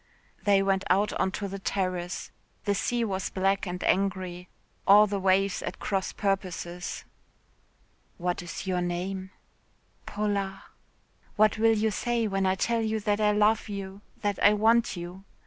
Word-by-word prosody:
They 200 -1 +4
went 195 0 +1
out 200 +3 +3
on - - +2
to 200 - -3
the 195 +1 -6
terrace. 185 -2 -2 0.3
The 205 - +2
sea 240 +4 0
was 190 -3 -2
black 195 +1 0
and 180 0 -4
angry, 185 -2 0 0.4
all 205 +2 +8
the 200 -1 -2
waves 195 0 +2
at - - -5
cross 195 -2 -2
purposes. 180 -3 -3 1.1
"What 180 0 -2
is 175 +2 -7
your 185 -1 0
name?" 185 +2 -3 0.8
"Paula." 200 -2 -2 0.7
"What 215 0 +3
will 225 0 +4
you 220 +1 +1
say 235 +1 0
when 195 -1 0
I 185 - +2
tell 230 +4 0
you 220 0 0
that 205 +1 0
I 210 0 +4
love 210 +1 +2
you, 195 -1 -6 0.2
that 205 -2 0
I 205 - +7
want 225 0 +3
you?" 175 +2 -7
195 Hz, 155 wpm, -28 LUFS, 185-210 Hz, 1.1 s, all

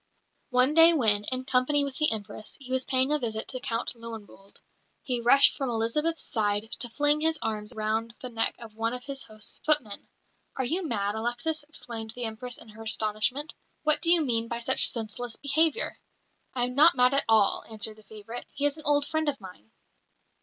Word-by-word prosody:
One 255 +2 +2
day 330 +1 +7
when, 210 -8 +3
in 255 +2 -3
company 270 +3 +3
with 280 -1 -5
the 305 - +3
Empress, 215 0 -6
he 260 -2 -10
was 260 0 0
paying 260 +2 +2
a 300 - +1
visit 220 -4 -3
to 255 - -4
Count 230 -1 -2
Löwenwolde, 220 -4 -12 0.4
he 250 -3 -2
rushed 260 +4 +5
from 270 -2 -3
Elizabeth's 245 +9 -1
side 210 -2 -1
to 240 - -2
fling 290 +5 +2
his 320 0 +1
arms 215 +1 -3
round 220 +2 -2
the 255 - -6
neck 225 -1 +2
of 230 -2 -11
one 225 +2 -2
of 250 - -8
his 275 -1 -2
host's 215 -1 -7
footmen. 255 -10 -1 0.5
"Are 260 - -2
you 340 +9 -1
mad, 205 -9 -1
Alexis?" 240 +8 -2
exclaimed 225 -7 -6
the 245 - -5
Empress, 230 +2 -4
in 225 - -11
her 215 +1 -13
astonishment. 220 +6 0 0.3
"What 305 0 +2
do 335 - 0
you 340 -1 +5
mean 230 -3 0
by 235 - -4
such 240 +3 +4
senseless 230 +1 -4
behaviour?" 315 - +1 0.6
"I 245 - +1
am 250 +1 -1
not 305 +6 +6
mad 250 +1 +4
at 275 - +4
all," 215 -3 +3
answered 220 0 +2
the - - -16
favourite. 215 +2 -10
"He 285 - -2
is 290 +1 +1
an 310 - -12
old 290 -1 +3
friend 315 0 0
of 280 - -4
mine." 180 - -13
245 Hz, 200 wpm, -27 LUFS, 220-285 Hz, 0.6 s, day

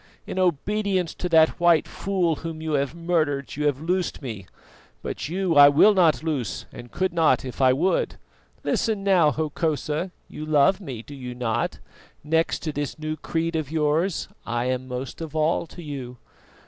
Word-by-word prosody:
In - - -4
obedience 185 +1 0
to 180 - -4
that 160 -1 +4
white 170 -2 +4
fool 180 -5 -1
whom 165 0 -6
you 160 0 -4
have 140 0 0
murdered, 160 -5 -1
you 150 +1 0
have 140 -2 0
loosed 180 +2 -1
me; 110 -9 -7 0.6
but - - -4
you 185 0 0
I 145 0 +9
will 155 +9 +6
not 170 -5 +3
loose 125 -8 -2
and 120 0 -10
could 185 -1 -1
not 160 -7 +3
if 130 +2 -6
I 130 -1 +6
would. 165 +9 +1 0.5
Listen 215 -3 0
now, 185 -6 +4
Hokosa: 155 +2 -1 0.2
you 150 - -8
love 155 +6 +3
me, 130 - -7
do 145 - -11
you 125 -3 -7
not? 120 -1 -1 0.5
next 160 +2 0
to 155 - -2
this 145 -1 -4
new 155 0 -3
creed 165 +2 -2
of 155 -4 -2
yours, 160 +3 0 0.2
I 120 +1 -2
am 130 0 -2
most 125 +4 -6
of 160 -2 -6
all 160 +2 +1
to 175 - -11
you. 130 -5 -6
155 Hz, 175 wpm, -24 LUFS, 140-170 Hz, 0.6 s, I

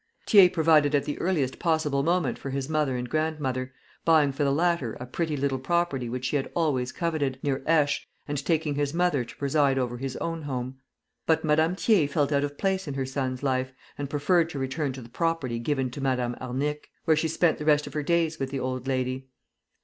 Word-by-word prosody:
Thiers 195 -4 +7
provided 155 -4 +4
at 140 -1 +1
the 145 - -4
earliest 155 -8 0
possible 160 -4 +1
moment 165 -4 0
for 135 - -5
his 135 0 -3
mother 150 -4 0
and 125 0 -3
grandmother, 135 -3 -1 0.3
buying 155 -4 +4
for 135 +2 -2
the 140 - +2
latter 165 -5 +1
a 125 - -7
pretty 155 +4 -2
little 135 -1 0
property 135 -3 0
which 125 +2 -4
she 135 +3 +1
had 135 - -3
always 135 -7 +1
coveted, 155 -6 -1
near 135 -2 0
Aix, 155 -3 +3 0.2
and 145 -2 -3
taking 155 -2 +1
his 145 +1 -1
mother 175 -7 +2
to 120 - -12
preside 140 -1 +2
over 120 -2 -1
his 135 -1 -4
own 165 -1 -3
home. 130 -2 -4 0.5
But 160 0 +2
Madame 160 +3 +3
Thiers 185 -9 +2
felt 145 -1 +1
out 140 -1 +2
of 145 0 -4
place 190 -2 0
in 140 - -4
her 135 -1 -1
son's 130 -1 -3
life, 130 -1 0 0.2
and 145 -1 -5
preferred 160 +4 +2
to 150 - -6
return 135 +2 -2
to 130 -1 -8
the - - -11
property 135 -4 -1
given 130 0 -1
to 140 - -7
Madame 125 -2 0
Arnic, 140 +4 -3 0.2
where 160 - +4
she 155 +1 +1
spent 160 +1 +1
the 150 - -5
rest 150 -1 +4
of - - -9
her 150 - -1
days 165 0 +1
with 135 -1 -2
the 135 0 -3
old 130 0 -3
lady. 130 0 -1
145 Hz, 215 wpm, -27 LUFS, 130-160 Hz, 0.5 s, Thiers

